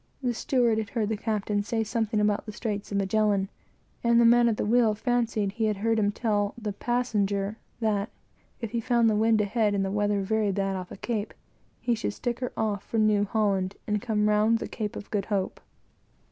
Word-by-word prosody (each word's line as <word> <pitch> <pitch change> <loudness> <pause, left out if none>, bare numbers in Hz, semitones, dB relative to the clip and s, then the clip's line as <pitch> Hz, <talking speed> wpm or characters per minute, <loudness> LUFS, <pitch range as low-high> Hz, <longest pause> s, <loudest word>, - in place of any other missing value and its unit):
The 245 -1 +1
steward 235 -2 +1
had 215 -2 -4
heard 220 -3 -1
the 220 - 0
captain 210 -1 -1
say 225 +2 -1
something 220 0 -1
about 210 +1 +1
the - - -4
straits 210 -2 -4
of 200 - 0
Magellan, 200 0 +1 0.5
and 235 0 +4
the 235 - +6
man 235 0 +6
at 220 - -1
the - - -1
wheel 225 -1 +3
fancied 225 -3 0
he 225 +2 -1
had 210 -2 0
heard 225 +2 +1
him 205 -1 +2
tell 205 -2 0
the 210 -3 -3
"passenger" 210 -3 -1 0.2
that, 215 -1 0 0.5
if 230 -3 -4
he 235 -1 -1
found 235 -1 +3
the - - +1
wind 220 0 +3
ahead 210 0 +1
and 195 -1 +1
the 190 - -2
weather 205 -1 +1
very 215 0 +1
bad 195 0 -1
off 185 -1 -5
the - - -9
Cape, 220 0 -3 0.4
he 240 - 0
should 225 - -2
stick 240 -1 -3
her 250 -1 -3
off 210 -2 0
for 230 - -4
New 215 -2 +3
Holland, 200 -3 0
and 210 -1 -1
come 215 -3 0
home 210 - +3
round 215 +2 +3
the - - -5
Cape 210 -3 -4
of 205 - -8
Good 200 -2 0
Hope. 200 -3 -2
215 Hz, 215 wpm, -27 LUFS, 205-230 Hz, 0.5 s, the